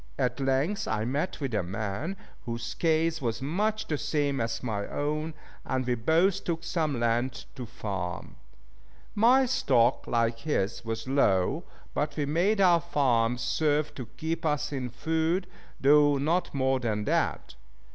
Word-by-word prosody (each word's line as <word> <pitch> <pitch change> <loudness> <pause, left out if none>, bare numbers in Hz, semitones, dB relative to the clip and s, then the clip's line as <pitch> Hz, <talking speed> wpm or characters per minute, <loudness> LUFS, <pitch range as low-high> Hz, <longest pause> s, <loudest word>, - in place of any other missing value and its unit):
At 125 +1 0
length 135 +9 0
I 110 0 -1
met 140 +8 -2
with 135 -5 -3
a 105 - +2
man 110 - -4 0.3
whose 115 0 -4
case 160 -1 +1
was 115 -3 -1
much 210 +10 -1
the 150 -2 -2
same 145 -3 0
as 115 +1 -2
my 105 -4 -2
own, 150 +2 -2 0.3
and 130 -1 -1
we 125 - +1
both 165 - +2
took 165 -1 -2
some 155 -7 -1
land 120 +1 0
to 125 -2 -7
farm. 95 -5 -5 0.8
My 250 +5 +5
stock, 130 - +2
like 115 -1 +1
his, 115 -7 -1
was 115 +2 -4
low, 100 -9 +2 0.3
but 150 0 -2
we 145 - +1
made 175 +9 +1
our 175 -3 +5
farms 120 -5 +1
serve 150 -1 +1
to 125 -4 -7
keep 160 +1 -3
us 150 -2 0
in 130 -3 -3
food, 160 - 0 0.3
though 145 +1 +5
not 165 +6 0
more 130 -1 +1
than 110 -4 -1
that. - - 0
140 Hz, 155 wpm, -28 LUFS, 115-160 Hz, 0.8 s, My